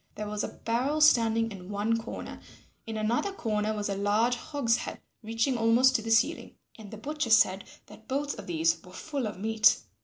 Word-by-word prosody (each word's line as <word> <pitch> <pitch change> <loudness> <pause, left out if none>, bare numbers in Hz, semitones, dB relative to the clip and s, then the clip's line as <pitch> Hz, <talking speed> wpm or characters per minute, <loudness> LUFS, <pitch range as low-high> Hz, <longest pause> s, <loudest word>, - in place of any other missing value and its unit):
There 210 - -5
was 210 0 -3
a - - -1
barrel 255 +7 -2
standing 230 -6 +4
in 185 -2 -10
one 205 +3 0
corner; - - -8 0.5
in 220 -1 -4
another 230 - 0
corner 215 - -2
was 210 -1 -2
a 200 - -1
large 210 +5 +1
hogshead 275 -4 -2 0.2
reaching 230 +3 -1
almost 235 +4 +4
to 225 - +2
the 225 - -6
ceiling, 225 +8 +1 0.2
and 215 -2 -11
the 220 - -9
butcher 295 +2 -3
said 195 -3 +4 0.2
that 220 - -16
both 280 +2 -2
of - - -9
these 165 -1 +1
were 180 - -15
full 280 +1 -4
of 210 - -7
meat. 220 +1 +3
225 Hz, 190 wpm, -28 LUFS, 210-245 Hz, 0.5 s, standing